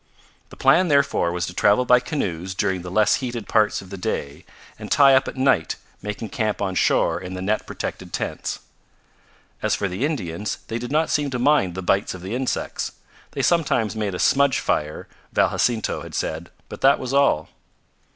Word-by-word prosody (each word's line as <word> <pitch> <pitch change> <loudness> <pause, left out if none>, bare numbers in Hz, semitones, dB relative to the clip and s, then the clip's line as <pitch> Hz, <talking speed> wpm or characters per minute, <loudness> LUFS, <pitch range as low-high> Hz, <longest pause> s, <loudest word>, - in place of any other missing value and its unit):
The - - -12
plan, 180 +2 +4
therefore, 140 - +2
was 85 0 -2
to 90 - -7
travel 105 +7 +3
by 125 0 +6
canoes 95 - -3
during 95 -1 0
the 90 - -7
less 105 +3 +3
heated 120 -4 -5
parts 110 -3 +2
of 95 - -15
the 100 - -7
day, 70 -4 -4 0.3
and - - -8
tie 140 -2 +6
up 130 - +4
at - - -5
night, 130 -11 +2 0.3
making 105 +2 -5
camp 110 -3 -1
on 95 -2 -1
shore 90 - +2
in 95 0 -6
the - - -5
net 105 +2 -1
protected - - -6
tents. - - -4 1.0
As - - +1
for 100 - -1
the 95 +6 -4
Indians, 105 - -2
they 115 +1 -2
did 120 +2 -6
not 155 +2 +1
seem 145 -1 +1
to 130 - -3
mind 125 - +2
the 95 - -5
bites 95 +1 +1
of 90 - -10
the 95 +4 -5
insects. 130 +1 -2 0.4
They - - -2
sometimes 125 - +1
made 105 -4 -2
a - - -3
smudge 140 +5 +3
fire, 75 0 -2 0.3
Val - - +3
Jacinto 115 -3 0
had - - -9
said, 80 +2 -3 0.2
but - - -10
that 135 +1 +5
was 130 +1 -5
all. 140 - +3
110 Hz, 195 wpm, -23 LUFS, 95-135 Hz, 1.0 s, by